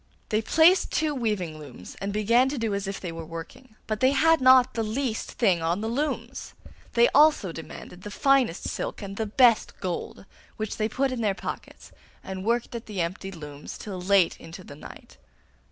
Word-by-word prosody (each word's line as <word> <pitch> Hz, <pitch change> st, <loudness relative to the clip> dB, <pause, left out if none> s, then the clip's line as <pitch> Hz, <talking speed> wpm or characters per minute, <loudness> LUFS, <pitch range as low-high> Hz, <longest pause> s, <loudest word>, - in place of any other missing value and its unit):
They 215 Hz, 0 st, +1 dB
placed 330 Hz, -, +4 dB
two 310 Hz, -1 st, 0 dB
weaving 210 Hz, -, -2 dB
looms, 130 Hz, -11 st, -11 dB
and 200 Hz, +1 st, -2 dB
began 230 Hz, +5 st, +3 dB
to 285 Hz, -, -4 dB
do 225 Hz, -3 st, -1 dB
as 200 Hz, 0 st, -3 dB
if 195 Hz, -, -4 dB
they 175 Hz, -, -5 dB
were 165 Hz, 0 st, -7 dB
working, 165 Hz, +10 st, -10 dB
but 215 Hz, -1 st, -3 dB
they 260 Hz, +1 st, +4 dB
had 325 Hz, +1 st, +4 dB
not 255 Hz, 0 st, +6 dB
the 230 Hz, -, -1 dB
least 225 Hz, +1 st, -3 dB
thing 190 Hz, -8 st, +2 dB
on 170 Hz, +4 st, 0 dB
the 220 Hz, -, -2 dB
looms. 285 Hz, +7 st, -3 dB, 0.4 s
They 235 Hz, 0 st, +5 dB
also 295 Hz, -, +4 dB
demanded 165 Hz, +2 st, -10 dB
the 210 Hz, -, -7 dB
finest 260 Hz, -4 st, +2 dB
silk -, -, -4 dB
and 195 Hz, 0 st, -6 dB
the 220 Hz, +1 st, -2 dB
best 235 Hz, +1 st, +3 dB
gold, 185 Hz, +1 st, -5 dB, 0.3 s
which 215 Hz, -1 st, -4 dB
they 215 Hz, 0 st, 0 dB
put 270 Hz, +2 st, 0 dB
in 250 Hz, -2 st, -3 dB
their 205 Hz, -3 st, +1 dB
pockets, -, -, -8 dB, 0.3 s
and 190 Hz, -1 st, -6 dB
worked 235 Hz, +3 st, 0 dB
at 235 Hz, -1 st, -7 dB
the 205 Hz, -3 st, -5 dB
empty 180 Hz, +3 st, -3 dB
looms 150 Hz, -4 st, -9 dB
till 190 Hz, -4 st, -7 dB
late 190 Hz, -1 st, +3 dB
into 170 Hz, +3 st, -10 dB
the 145 Hz, -, -11 dB
night. 150 Hz, -, -13 dB
215 Hz, 195 wpm, -26 LUFS, 185-255 Hz, 0.4 s, not